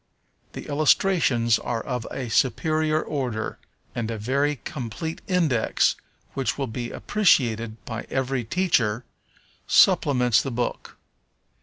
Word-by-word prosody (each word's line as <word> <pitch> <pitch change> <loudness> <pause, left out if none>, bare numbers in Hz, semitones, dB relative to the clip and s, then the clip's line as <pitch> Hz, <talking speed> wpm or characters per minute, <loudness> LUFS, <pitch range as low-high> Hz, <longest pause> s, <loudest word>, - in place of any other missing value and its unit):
The - - -7
illustrations 145 -6 +3
are 115 -2 -3
of 125 -3 -4
a 130 -2 -5
superior 155 +6 +1
order, 125 -7 -3 0.3
and 115 -1 -3
a 115 - -3
very 140 +7 0
complete 150 +3 -5
Index, 160 - +2 0.4
which 135 -1 -1
will 140 - -1
be 120 0 -5
appreciated 115 - +1
by 115 -1 -6
every 130 -1 -1
teacher, 120 - 0 0.6
supplements 125 -5 +4
the 135 - -4
book. 120 -1 -4
130 Hz, 115 wpm, -24 LUFS, 115-150 Hz, 0.6 s, supplements